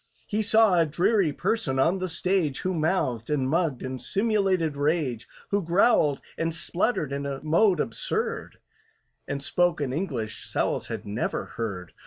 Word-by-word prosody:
He 210 +1 -1
saw 215 -4 +5
a 165 - +4
dreary 175 +3 +2
person 145 -5 -1
on 170 +8 +2
the 185 - -2
stage, 170 -4 0
Who 185 - -1
mouthed 155 - 0
and 140 -3 +1
mugged 155 -3 0
in 130 0 -4
simulated 195 - +1
rage, 145 -5 0 0.2
Who 200 0 +1
growled 170 - +3 0.2
and 165 0 -1
spluttered 170 - 0
in 140 0 -3
a 135 -1 -4
mode 170 +3 +3
absurd, 115 - -2 0.7
And 140 0 -3
spoke 175 +1 +1
an 135 -3 -2
English 135 - -3
SOWLS - - -1
had - - -5
never 105 +4 -2
heard. 100 -6 -5
160 Hz, 155 wpm, -26 LUFS, 135-185 Hz, 0.7 s, saw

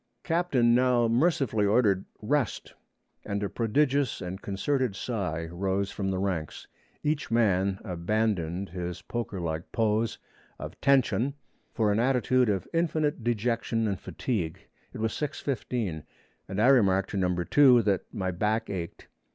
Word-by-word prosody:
Captain 165 -9 +2
now 125 -1 +3
mercifully 120 -3 +2
ordered, 100 -2 +3 0.2
'Rest,' 135 +2 -1 0.5
and 100 0 -3
a 100 - -1
prodigious 135 +3 +1
and 90 +2 -6
concerted 120 +3 -1
sigh 90 -9 -3
rose 95 +2 -1
from 95 -1 -3
the 95 - -1
ranks. 95 -5 -3 0.4
Each 150 0 -1
man 100 -4 +2
abandoned 95 -1 -1
his 90 0 -5
pokerlike 90 -9 -4
pose 110 0 +1 0.4
of - - -9
'Ten 140 -2 +5
shun' 130 +5 -1 0.4
for 110 -3 +1
an 105 - +1
attitude 125 -1 +2
of 95 -3 -1
infinite 155 -5 0
dejection 115 0 0
and 100 -3 -2
fatigue. 90 -11 -3 0.2
It - - -9
was 110 0 -1
6:15 125 - -3 0.5
and 95 +1 -4
I 110 - +4
remarked 100 -7 +4
to 100 - -2
Number 90 -2 0
2 130 -5 +6
that 100 -3 -1
my 95 -2 -2
back 105 +5 -1
ached. 85 -3 -6
110 Hz, 140 wpm, -28 LUFS, 95-125 Hz, 0.5 s, 2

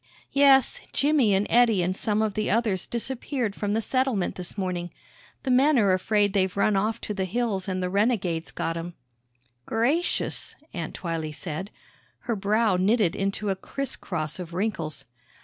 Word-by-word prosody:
"Yes 275 -2 +5
Jimmy 275 -8 +3
an' 195 +2 +2
Eddie 230 -6 +4
an' 180 +2 0
some 210 +2 0
of 215 -2 -1
the 215 - -1
others 210 -4 +1
disappeared 245 -1 -2
from 205 0 -2
the 225 +1 0
settlement 255 -8 0
this 180 +2 -6
morning. 180 -2 -2 0.5
The 265 - 0
men're 250 -6 +4
afraid 205 +1 +2
they've 190 -1 +1
run 200 +1 +3
off 215 +4 0
to 210 - -4
th' 200 - -9
hills 205 -2 -1
an' 185 0 -2
the 180 - 0
renegades 195 -6 0
got 165 0 -3
'em." 170 +1 -6 0.7
"Gracious," 275 +10 0 0.2
Aunt 165 -4 -5
Twylee 160 -3 -4
said; 170 +4 -5 0.5
her 235 - -2
brow 210 0 +2
knitted 200 0 +2
into 195 +1 -1
a - - 0
criss 275 +7 -5
cross 155 -3 -4
of 170 -1 -7
wrinkles. 175 -7 -2
205 Hz, 165 wpm, -26 LUFS, 185-230 Hz, 0.7 s, Yes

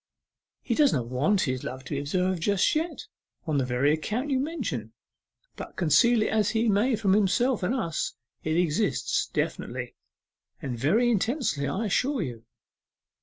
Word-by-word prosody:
He - - -1
does 295 -3 +4
not 120 -3 -1
want 150 +11 +2
his 130 -1 -1
love 130 +1 -6
to 125 - -5
be 140 - -1
observed 180 +4 -1
just 200 +1 +2
yet, 325 +3 -2 0.4
on 155 -4 0
the 130 - 0
very 130 +4 +2
account 225 - -2
you 265 - +2
mention; 220 - -3 0.6
but - - -8
conceal 215 - +4
it - - -1
as 215 -2 +2
he 230 0 +1
may 220 +5 +3
from 195 -3 +1
himself 215 +5 +2
and 190 +8 0
us, 170 -11 -2 0.3
it 155 +1 0
exists 205 - 0
definitely - - -3 0.7
and 135 -6 -4
very 210 - +2
intensely, 220 - 0
I 190 +11 -2
assure 255 +5 +1
you. 120 -5 -7
190 Hz, 165 wpm, -27 LUFS, 145-240 Hz, 0.7 s, does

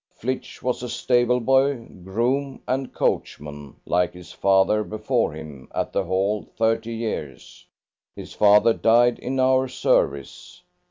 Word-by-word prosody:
Flitch 130 +2 -5
was 125 -1 -1
a 125 - -5
stable 125 0 +1
boy, 135 0 +2 0.2
groom, 125 +8 -1
and 130 +1 -2
coachman, 75 -1 -3
like 90 -1 0
his 90 -1 -12
father 100 +2 +2
before 110 +2 -1
him, 75 -4 -10
at - - -2
the - - +1
Hall 100 +3 0 0.2
thirty 115 0 0
years; 110 - -6 0.5
his - - -9
father 105 +2 +5
died 120 +2 +3
in 130 +1 -3
our 130 0 +3
service. 70 - -1
115 Hz, 130 wpm, -23 LUFS, 95-125 Hz, 0.5 s, father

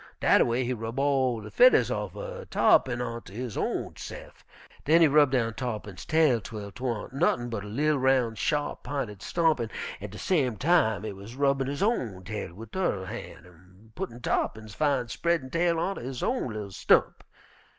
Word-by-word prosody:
Dat - - +5
a - - +5
way 120 +2 0
he 125 +1 -1
rub 115 +1 -5
all 135 -4 +1
de 105 0 -9
fedders 250 +1 +5
offen - - -5
Tarr'pin 125 -2 +3
onter 115 -4 -7
his 120 0 -5
own - - -2
se'f. - - -10 0.4
Den 165 +3 +5
he 165 - +8
rub 145 -1 +5
down 120 -4 0
Tarr'pin's 105 -7 -5
tail 155 -7 +3
'twel 100 0 -7
'twan't 125 -1 -4
nuttin' 120 -5 +1
but 105 -3 -3
a - - -8
li'l 145 +7 +1
roun', 130 -3 +2
sharp 145 +6 -1
p'inted 125 -7 -4
stump, 160 +1 +1
an' 115 -2 -2 0.3
at 105 - -6
de 105 - -10
same 130 - +1
time 140 - +2
he 110 -2 -4
wuz 100 +5 -11
rubbin' 135 -1 +1
his 140 +5 -2
own 120 - -1
tail 105 -2 -5
wid 110 +2 -10
tu'rr 175 - -1
han' 90 - -8
an' 90 +5 -20
puttin' 120 +2 -6
Tarr'pin's 110 -2 -2
fine, 140 -4 +1
spreadin' 165 0 -1
tail 170 0 +1
onter 195 +4 -2
his 125 +1 -5
own 245 - -1
li'l 105 -2 -6
stump. - - +2
125 Hz, 185 wpm, -27 LUFS, 110-145 Hz, 0.4 s, he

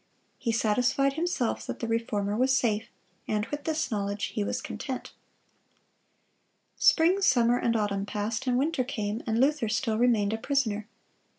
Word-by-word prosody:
He 235 - -1
satisfied 245 +5 +2
himself 320 -6 -1
that - - -5
the 230 - -3
Reformer 210 -3 -1
was 260 +3 +3
safe, 220 -3 0 0.4
and 210 -1 0
with 290 0 -4
this 315 -4 -1
knowledge 205 -1 -2
he 210 - -1
was - - -2
content. - - -6 1.6
Spring, 355 +4 +4
summer, 245 -7 +4
and 230 -1 +1
autumn 205 -2 -1
passed, 210 +5 -3
and 250 -1 +2
winter 275 0 +1
came, 220 -3 -3
and 225 0 +1
Luther 275 -3 +2
still 220 0 0
remained 220 -4 +3
a 225 - -2
prisoner. 225 -6 -1
230 Hz, 155 wpm, -28 LUFS, 210-265 Hz, 1.6 s, Spring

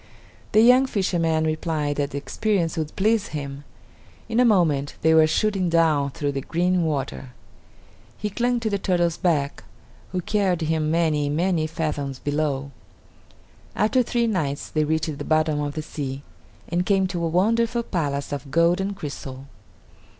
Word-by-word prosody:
The 215 - +6
young 250 +3 +6
fisherman 170 -7 0
replied 155 -2 -1
that 145 -1 0
the 140 - -5
experience 175 +2 -1
would 155 -3 -4
please 215 +1 +2
him. 140 0 -7 0.6
In 230 0 0
a - - +6
moment 160 - +2
they 160 0 +5
were 160 -1 +6
shooting 190 +2 +1
down 160 -4 +3
through 145 +1 -2
the 140 -1 -3
green 180 +5 +1
water. 135 -4 -3 0.8
He 210 - -3
clung 245 +3 0
to 220 - 0
the 200 - 0
turtle's 175 -3 +1
back, 150 -6 0 0.5
who 185 - -1
carried 190 -3 0
him 160 -1 0
many, 155 -3 +1
many 165 +1 +1
fathoms 150 -4 -3
below. 145 -1 -2 1.0
After 220 +6 +3
three 240 0 0
nights 160 -11 -2
they 155 -1 0
reached 155 -1 -1
the - - -3
bottom 155 -1 +1
of 145 0 -3
the 155 - -3
sea, 140 -3 -5 0.4
and 175 +1 0
came 195 0 +2
to 180 -2 -3
a - - +1
wonderful 230 +7 +1
palace 145 -8 -2
of 140 -1 -5
gold 170 +5 +3
and 195 +1 -2
crystal. 135 -5 -7
160 Hz, 160 wpm, -24 LUFS, 145-190 Hz, 1.0 s, The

